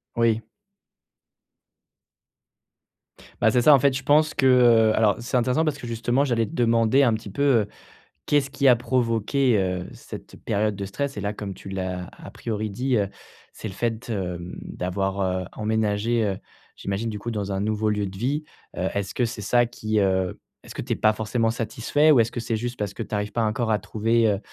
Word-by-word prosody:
Oui. 115 -1 +2 3.0
Bah, 110 - +5
c'est 120 +2 +2
ça, 150 - +8
en 140 - +6
fait 135 0 +2
je 130 - -7
pense 155 +2 +3
que, 135 - +1
heu 120 -4 +5
alors 110 -2 +3
c'est 120 +2 -4
intéressant 125 +6 +2
parce 150 -1 -1
que 120 - -7
justement 115 +4 0
j'allais 120 -5 +1
te - - -10
demander 115 +2 +3
un 130 -4 +4
petit 105 -2 -8
peu, 140 - -4 0.2
heu, 105 - -4 0.6
qu'est 145 - +4
ce 135 0 -6
qui 140 -1 +1
a 125 - +8
provoqué, 120 0 +1
heu, 90 -2 -1
cette - - -10
période 105 0 0
de 100 0 -4
stress, 135 +6 -4
et 100 - -3
là, 100 +1 -2
comme 100 -2 -6
tu - - -10
l'as 95 -2 -4
à - - -12
priori 110 -1 -4
dit, 125 +5 0
heu, 100 -2 +1 0.5
c'est - - -7
le 95 - -7
fait, 115 +2 -3
hem, 90 -4 -4
d'avoir, 95 +2 -3
heu, 95 -1 -1
emménagé, 110 +1 0
heu, 100 -3 -1 0.4
j'imagine 100 +4 -3
du 105 - -4
coup, 120 +3 -5
dans 100 -3 -3
un 95 - -1
nouveau 110 +1 0
lieu 105 -1 0
de 95 0 -7
vie. 140 +9 -1 0.3
Heu, 95 - 0
est-ce 100 -2 -3
que 125 - +2
c'est 115 -2 -5
ça 120 +4 +3
qui, 110 -2 -2
heu 95 -1 0 0.2
est-ce - - -11
que - - -3
tu - - -1
es - - -1
pas 110 0 +3
forcément 110 +2 0
satisfait 115 +7 +1
ou 140 - +6
est-ce 115 0 +2
que 120 - -4
c'est 115 -1 -2
juste 120 +2 -4
parce 100 -1 -3
que - - -7
tu 105 - -4
arrives 105 0 -2
pas 115 - 0
encore 110 +1 0
à 105 - +2
trouver, 115 +3 +1
heu, 100 - -3
110 Hz, 215 wpm, -24 LUFS, 100-120 Hz, 3.0 s, ça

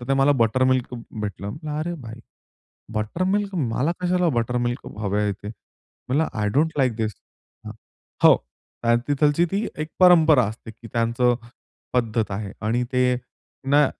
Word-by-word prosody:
तर 120 - -9
ते 135 - +3
मला 135 +1 +4
बटर 130 +4 +1
मिल्क 130 -1 +1 0.3
भेटलं. 100 +3 -5 0.2
अरे 170 +3 -2
भाई 115 0 -9 0.7
बटर 110 +11 -2
मिल्क 200 +1 0
मला 135 0 0
कशाला 180 0 +2
बटर 125 -2 0
मिल्क 120 +1 -2
हवंय 105 0 0
ते? 100 +1 -9
म्हणलं, 130 +6 -4
"आय 105 -1 0
डोंट 155 +4 +3
लाइक 130 -5 +2
दिस." 110 -1 -1 1.1
हो, - - +9 0.7
तिथलची 145 +3 +3
ती 200 +3 0
एक 155 - -2
परंपरा 160 -7 +6
असते, 110 +2 -7
की 115 +1 -13
त्यांचं 120 +1 +2 0.6
पद्धत 115 -3 0
आहे 100 0 -4
आणि 115 +3 0
ते 125 0 +3 0.6
ना 145 +1 +6
125 Hz, 145 wpm, -23 LUFS, 110-150 Hz, 1.1 s, हो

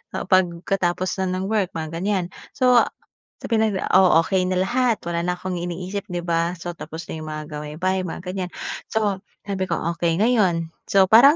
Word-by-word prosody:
ah, - - -2
pagkatapos 185 0 +1
na 190 - +1
ng 190 - -2
work, 205 -5 +1
mga 160 -1 -4
ganyan. 195 -1 0 0.3
So, 250 -2 +5 0.6
sabihin 220 -2 +2
natin, 190 - -2
oh, 185 -3 +7
okey 185 0 +1
na 185 0 +1
lahat, 245 +2 +1
wala 170 0 -2
na 180 0 0
akong 180 -1 -3
iniisip, 180 +4 -4
di 175 -1 -2
ba. 170 0 0
So 175 +1 -4
tapos 160 0 -7
na 160 - -5
yung 155 - -7
mga 155 0 -4
gawaing 150 +1 -6
bahay, 185 0 +1
mga 170 - -6
ganyan. 180 0 -3 0.4
So 210 -3 +1 0.3
sabi 190 -2 -1
ko, 170 - +1 0.2
okey 170 -1 +1
ngayon, 185 -8 +2 0.2
so 195 -1 +5
parang, 270 +7 +9
185 Hz, 190 wpm, -23 LUFS, 170-200 Hz, 0.6 s, parang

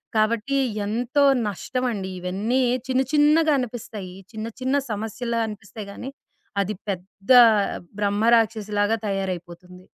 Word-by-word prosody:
కాబట్టీ, 225 +5 +1 0.3
ఎంతో 245 +6 +1 0.2
నష్టమండి. 215 -1 -3
ఇవన్నీ 200 +8 -1 0.3
చిన్న 260 0 +2
చిన్నగానిపిస్తాయి 270 - +1 0.2
చిన్న, 220 +1 -4
చిన్న 260 +2 +1 0.2
సమస్యల్లా 225 +2 -3
అనిపిస్తాయి 210 0 -8
గానీ, 245 +6 -7 0.5
అది 200 +2 -2 0.2
పెద్దా 195 +6 +4 0.6
బ్రహ్మ 205 +1 +1
రాక్షసిలాగా 215 -1 +1
తయారైపోతుంది. 180 -2 -5
215 Hz, 95 wpm, -24 LUFS, 195-245 Hz, 0.6 s, పెద్దా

